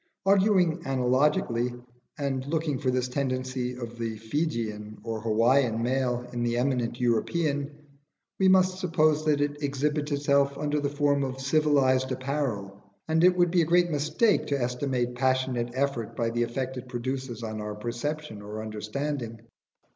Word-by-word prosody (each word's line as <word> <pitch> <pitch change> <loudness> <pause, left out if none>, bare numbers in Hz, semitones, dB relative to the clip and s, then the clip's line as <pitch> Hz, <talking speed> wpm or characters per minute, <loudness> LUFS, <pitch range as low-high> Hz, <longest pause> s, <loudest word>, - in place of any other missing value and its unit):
Arguing 190 -4 +3
analogically, 125 -2 +1 0.4
and 135 -2 -2
looking 155 -3 -1
for 130 - 0
this 125 0 0
tendency 130 -1 -2
of 120 -1 -7
the 115 -1 -3
Fijian 110 -4 -3
or 115 -1 -4
Hawaian 115 +2 +3
male 125 -1 0
in 120 - -2
the 120 0 0
eminent 120 -2 0
European, 140 +4 0 0.7
we 190 - +4
must 185 0 +4
suppose 155 -4 +2
that 150 -2 +2
it 145 0 -1
exhibits 145 +1 -1
itself 140 -1 +2
under 150 0 0
the 145 -1 -1
forms 145 -1 +1
of 130 0 -5
civilised 135 -2 +2
apparel; 130 -7 -3 0.3
and 160 +1 +2
it 180 0 +5
would 175 -1 +3
be 175 -1 +4
a - - +2
great 175 +1 +3
mistake 155 +9 +2
to 140 -1 0
estimate 125 0 -1
passionate 130 -1 0
effort 130 -5 -1
by 115 -1 0
the 120 +1 -1
effect 130 +2 -2
it 125 0 -8
produces 125 -1 -4
on 110 -1 -4
our 105 0 -5
perception 120 +2 -4
or 105 +1 -6
understanding. 115 +3 -4
130 Hz, 155 wpm, -27 LUFS, 120-150 Hz, 0.7 s, it